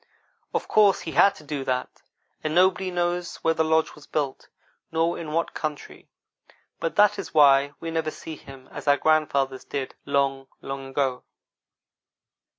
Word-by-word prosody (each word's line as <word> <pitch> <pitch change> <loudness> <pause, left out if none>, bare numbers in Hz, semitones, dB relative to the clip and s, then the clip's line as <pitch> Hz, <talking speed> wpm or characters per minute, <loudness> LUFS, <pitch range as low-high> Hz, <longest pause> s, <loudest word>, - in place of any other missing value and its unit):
Of - - -2
course 205 -2 +4
he 165 - -5
had 195 +7 +5
to 155 - -14
do 145 -2 -4
that, 125 0 -3 0.4
and 155 +1 -2
nobody 185 +1 +3
knows 175 0 -1
where 165 - +3
the 160 - +1
lodge 160 0 +2
was 150 - -15
built, 140 -3 -3 0.4
nor 165 +1 +1
in 160 -2 -6
what 165 +2 -1
country, 155 -2 -6 0.7
but 165 - -2
that 210 0 +4
is - - -7
why 140 -1 +6
we 165 - -5
never 160 -1 -1
see 160 +1 -8
him 135 -3 -13
as - - -8
our 145 0 +5
grandfathers 140 -4 +1
did, 135 -2 -4
long, 135 -1 0
long 135 0 -6
ago. 135 -2 -1
155 Hz, 160 wpm, -25 LUFS, 140-165 Hz, 0.7 s, why